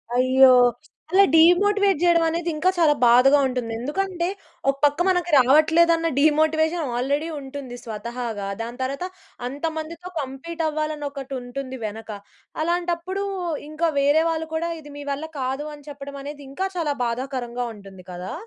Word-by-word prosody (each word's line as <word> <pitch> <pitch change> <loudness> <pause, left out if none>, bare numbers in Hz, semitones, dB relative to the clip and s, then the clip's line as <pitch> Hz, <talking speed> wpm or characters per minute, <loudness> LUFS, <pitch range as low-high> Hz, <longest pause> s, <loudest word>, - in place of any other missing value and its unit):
అయ్యో! 260 +1 +6 0.6
అలా 390 +2 +6
డీమోటివేట్ 390 +4 +5
చేయడం 340 -1 +4
అనేది 335 +1 -1
ఇంకా 320 +5 +2
చాలా 320 -4 +5
బాధగా 250 +4 +6
ఉంటుంది. 250 -3 -3
ఎందుకంటే, 345 +6 -2 0.4
ఒక 275 - +2
పక్క 290 +2 +1
మనకు 355 -2 +1
రావట్లేదన్న 320 +5 +4
డీమోటివేషన్ 315 +1 +2
ఆల్రెడీ 285 +5 0
ఉంటుంది 270 -2 -8
స్వతహాగా. 230 -2 -5
దాని 235 +2 -6
తర్వాత, 275 +7 -3 0.4
అంతమందితో 320 +5 -5
కంప్లీట్ 285 +5 -5
అవ్వాలని 305 -1 -3
ఒకటి 275 -1 -8
ఉంటుంది 260 +1 -6
వెనక. 220 +1 -7 0.5
అలాంటప్పుడు 350 +3 -1 0.5
ఇంక 310 +2 -11 0.2
వేరే 290 +3 +4
వాళ్ళు 320 0 -2
కూడా, 335 +1 -1
"ఇది 295 -1 -12
మీ 290 - -7
వల్ల 285 +3 -3 0.2
కాదు" 265 +3 -2
అని 290 -1 -17
చెప్పడం 280 0 -8
అనేది 290 0 -8
ఇంకా 375 +8 -2
చాలా 310 -4 0
బాధాకరంగా 245 0 -3
ఉంటుంది 195 -3 -13
కదా! 180 +1 -6
290 Hz, 140 wpm, -23 LUFS, 260-330 Hz, 0.6 s, అయ్యో